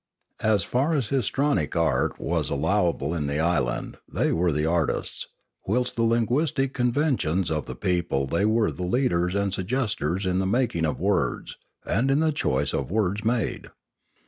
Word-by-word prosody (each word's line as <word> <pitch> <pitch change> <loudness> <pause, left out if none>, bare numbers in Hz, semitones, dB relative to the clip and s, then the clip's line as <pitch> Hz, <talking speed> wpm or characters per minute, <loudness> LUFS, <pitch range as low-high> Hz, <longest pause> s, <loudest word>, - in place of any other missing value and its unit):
As 110 -3 +2
far 140 +6 +1
as 130 -8 -1
histrionic 140 +1 0
art 80 -6 +1
was - - -1
allowable 80 0 0
in 75 -4 -2
the 70 +1 -1
island 75 -8 0
they - - +1
were 85 +1 +2
the 75 +1 0
artists, 80 -1 -1 0.4
whilst 125 +5 0
in 115 - -1
the 115 - +3
linguistic 135 +3 0
conventions 125 - +1
of 75 -1 -2
the - - -6
people 85 -6 0
they 85 +8 0
were 110 0 +2
the - - -8
leaders 90 -3 +1
and 100 -1 0
suggesters 95 - -1
in 90 0 +1
the 95 - 0
making 105 -7 +1
of 75 - -3
words, - - 0 0.3
and 120 +8 +1
in 135 +2 +3
the 160 0 +2
choice 145 - 0
of 70 - -2
words 105 +1 0
made. 115 +1 -1
100 Hz, 170 wpm, -25 LUFS, 85-125 Hz, 0.4 s, the